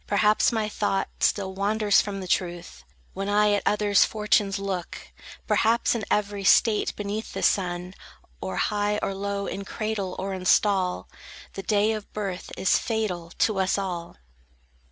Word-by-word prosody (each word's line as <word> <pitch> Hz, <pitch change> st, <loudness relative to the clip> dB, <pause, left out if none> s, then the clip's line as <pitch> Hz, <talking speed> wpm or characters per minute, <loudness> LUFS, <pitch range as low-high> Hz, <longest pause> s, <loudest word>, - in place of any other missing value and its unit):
Perhaps 210 Hz, +1 st, +3 dB
my 220 Hz, -2 st, -1 dB
thought 205 Hz, -2 st, -1 dB
still 190 Hz, -2 st, +1 dB
wanders 205 Hz, +1 st, +2 dB
from 200 Hz, -2 st, -5 dB
the 185 Hz, -, -6 dB
truth, 175 Hz, -, -2 dB, 0.3 s
When 195 Hz, +1 st, -3 dB
I 210 Hz, 0 st, +3 dB
at 205 Hz, -, +1 dB
others' 205 Hz, -1 st, +4 dB
fortunes 210 Hz, -2 st, +1 dB
look: 195 Hz, -3 st, -4 dB, 0.5 s
Perhaps 230 Hz, +1 st, +2 dB
in 225 Hz, -4 st, -3 dB
every 205 Hz, -1 st, 0 dB
state 210 Hz, +2 st, +3 dB
beneath 205 Hz, +2 st, -4 dB
the -, -, -4 dB
sun, 180 Hz, -2 st, 0 dB, 0.5 s
Or 95 Hz, 0 st, -4 dB
high, 205 Hz, -, 0 dB
or 195 Hz, -, -1 dB
low, 200 Hz, 0 st, -3 dB
in 200 Hz, -, -4 dB
cradle 205 Hz, -2 st, -3 dB
or 195 Hz, +1 st, -3 dB
in 185 Hz, -1 st, -6 dB
stall, 190 Hz, -2 st, +2 dB, 0.5 s
The 195 Hz, -, -5 dB
day 210 Hz, +2 st, +2 dB
of 215 Hz, -2 st, -5 dB
birth 195 Hz, -4 st, -4 dB
is 190 Hz, -, +3 dB
fatal 205 Hz, -7 st, -2 dB
to 215 Hz, -3 st, +1 dB
us 190 Hz, +1 st, +1 dB
all. 180 Hz, -4 st, -4 dB
200 Hz, 155 wpm, -25 LUFS, 190-210 Hz, 0.5 s, others